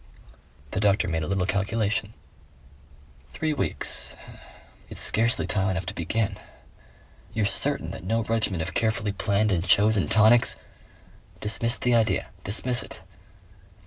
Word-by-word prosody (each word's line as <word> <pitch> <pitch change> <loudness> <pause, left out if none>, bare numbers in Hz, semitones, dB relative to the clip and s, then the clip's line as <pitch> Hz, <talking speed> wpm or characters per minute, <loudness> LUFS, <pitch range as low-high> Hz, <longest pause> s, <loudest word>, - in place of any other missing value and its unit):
The - - -2
doctor 100 -2 +2
made 80 -2 -1
a 75 - -3
little 95 -1 0
calculation. 105 +2 -1 1.2
"Three 155 -1 -1
weeks.... 145 - -2 0.7
It's - - -4
scarcely 115 +1 +2
time 95 -1 0
enough 95 -1 -2
to - - -4
begin." 100 +3 -2 1.0
"You're 110 -2 +1
certain 100 - +1
that - - -8
no 115 +5 0
regimen 110 -6 -1
of - - -3
carefully 110 -2 0
planned 100 +2 0
and 90 -3 +1
chosen 100 +1 +4
tonics 110 +2 +5 0.4
" - - -27
"Dismiss 115 +3 0
the 125 - +1
idea. 110 -5 +1
Dismiss 120 +5 0
it." - - -10
105 Hz, 135 wpm, -25 LUFS, 95-115 Hz, 1.2 s, tonics